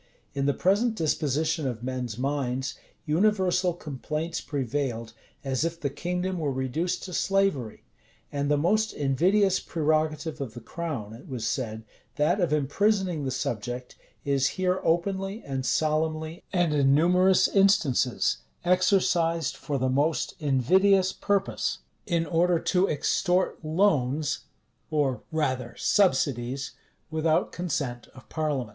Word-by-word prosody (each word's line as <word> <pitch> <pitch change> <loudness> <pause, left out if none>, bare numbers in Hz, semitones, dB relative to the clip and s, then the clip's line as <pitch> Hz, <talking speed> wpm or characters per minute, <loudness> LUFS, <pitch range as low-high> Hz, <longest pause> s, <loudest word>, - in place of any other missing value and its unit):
In 140 -1 -1
the 140 - +3
present 210 +6 +2
disposition 155 -2 0
of 120 -2 -4
men's 125 -3 -3
minds, 130 -1 -1 0.3
universal 180 +1 +2
complaints 155 +2 -4
prevailed, 130 -5 -3 0.3
as 135 0 -1
if 165 0 -2
the 140 -4 -2
kingdom 180 +3 -2
were 150 -3 -1
reduced 145 +8 -2
to 185 - -7
slavery. 195 - 0 0.5
And 145 0 -1
the 145 - +3
most 215 +8 +1
invidious 180 +8 +2
prerogative 155 -1 -1
of 120 -5 -5
the - - -6
crown, 120 -4 -5
it 115 - -12
was 125 -4 -4
said, 110 -4 -2 0.3
that 165 +7 +2
of 170 -4 +1
imprisoning 175 +2 +1
the - - -1
subject, 125 0 -4 0.3
is 140 -1 +2
here 185 0 +1
openly, 195 +5 0
and 135 -1 -3
solemnly, 155 +1 0
and 175 -5 +2
in 140 -2 +4
numerous 180 +4 +4
instances, 190 - +2 0.3
exercised 175 -3 +2
for 145 - -3
the 130 0 0
most 145 +5 +1
invidious 185 +8 +3
purpose; 200 -2 -1 0.3
in 170 -3 +1
order 170 +3 +2
to 185 +3 +1
extort 180 +5 0
loans, 155 -4 +1 0.4
or 140 -5 0
rather 130 -7 -1
subsidies, 135 - +1 0.4
without 160 0 +1
consent 150 -9 -3
of 130 - -14
parliament. 145 -7 -2
155 Hz, 125 wpm, -27 LUFS, 135-180 Hz, 0.5 s, in